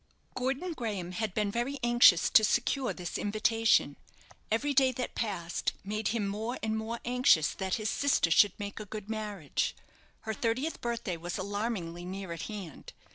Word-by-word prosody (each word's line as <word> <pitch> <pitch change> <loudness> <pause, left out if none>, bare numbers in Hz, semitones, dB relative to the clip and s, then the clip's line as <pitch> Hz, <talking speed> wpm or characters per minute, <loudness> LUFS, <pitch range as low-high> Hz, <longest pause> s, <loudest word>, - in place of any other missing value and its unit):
Gordon 270 +8 -2
Graham 205 - -4
had 205 +1 -3
been 210 -2 +1
very 240 +6 -2
anxious 240 -8 +6
to 220 - +7
secure 250 +4 +1
this 180 -1 -5
invitation. 215 -6 +2 0.5
Every 280 +6 +1
day 265 -1 +5
that 250 0 -4
passed 180 -6 -2
made 210 +1 -2
him 220 -2 0
more 220 +5 -3
and 220 0 0
more 220 +2 -3
anxious 250 - +4
that 190 -1 -2
his 215 -1 -2
sister 280 -12 +2
should 205 +4 +5
make 205 0 -5
a 215 - -6
good 210 +1 -7
marriage. 210 -9 -2 0.5
Her 220 - -3
thirtieth 245 +9 -1
birthday 235 -7 -2
was 175 +2 -5
alarmingly 195 -4 -3
near 190 0 -6
at 165 -1 -5
hand. 195 -8 -8
215 Hz, 165 wpm, -30 LUFS, 190-235 Hz, 0.5 s, to